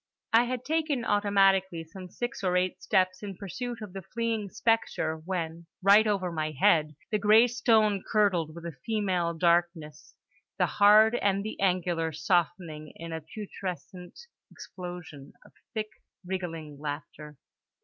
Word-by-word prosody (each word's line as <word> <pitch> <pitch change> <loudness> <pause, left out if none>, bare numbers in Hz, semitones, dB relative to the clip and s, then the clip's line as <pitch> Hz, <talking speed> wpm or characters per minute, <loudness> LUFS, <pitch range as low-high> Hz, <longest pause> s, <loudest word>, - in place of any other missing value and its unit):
I 230 +2 +6
had 250 0 -4
taken 305 -5 0
automatically 195 -4 +2
some 180 +3 -11
six 240 +1 -5
or 180 -1 +2
eight 180 0 -1
steps 185 0 +1
in 200 -3 -7
pursuit 235 +4 -6
of 200 -4 -9
the 195 - -6
fleeing 225 0 -3
spectre 225 -8 0
when, 165 0 -5 0.2
right 205 +3 +6
over 190 -4 0
my 155 -1 -2
head, 155 -6 +3 0.2
the 210 - +1
grey 215 +3 +6
stone 220 -5 +2
curdled 180 -7 +2
with 170 0 -9
a 170 - -4
female 185 -6 0
darkness; 170 -3 0 0.4
the 180 - +3
hard 210 +6 +6
and 200 -4 +1
the 215 - -6
angular 175 -3 0
softening 160 0 -1
in 165 0 -7
a 160 - -4
putrescent 180 0 -8 0.3
explosion 175 -6 -9
of - - -18 0.2
thick 215 -1 -2 0.4
wriggling 165 -6 -5
laughter. 150 0 -7
185 Hz, 140 wpm, -28 LUFS, 165-210 Hz, 0.4 s, I